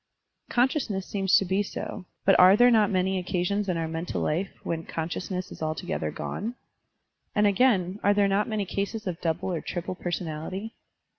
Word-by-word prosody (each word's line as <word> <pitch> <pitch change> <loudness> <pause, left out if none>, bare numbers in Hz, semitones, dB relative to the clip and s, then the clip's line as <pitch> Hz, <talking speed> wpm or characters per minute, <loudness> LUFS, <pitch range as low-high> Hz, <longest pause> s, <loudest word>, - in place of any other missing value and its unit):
Consciousness 240 -6 +1
seems 195 -2 +2
to 195 - +4
be 190 +2 +1
so, 190 -2 -6 0.2
but 195 - +6
are 185 +2 +8
there 245 +1 +6
not 215 -3 +4
many 190 0 +1
occasions 185 +3 -1
in 175 - 0
our 165 -1 -1
mental 165 +2 -3
life 175 +5 0
when 165 -1 -2
consciousness 180 +3 -4
is - - -10
altogether 155 - -2
gone? 225 - -4 0.8
And, 210 - +4
again, 200 -3 +3
are 205 0 +3
there 200 -1 +4
not 200 +3 +1
many 215 -2 -1
cases 200 +3 -3
of 180 -3 -4
double 170 +2 -1
or 165 - -2
triple 175 +1 -4
personality? 175 +4 -4
190 Hz, 170 wpm, -27 LUFS, 175-205 Hz, 0.8 s, are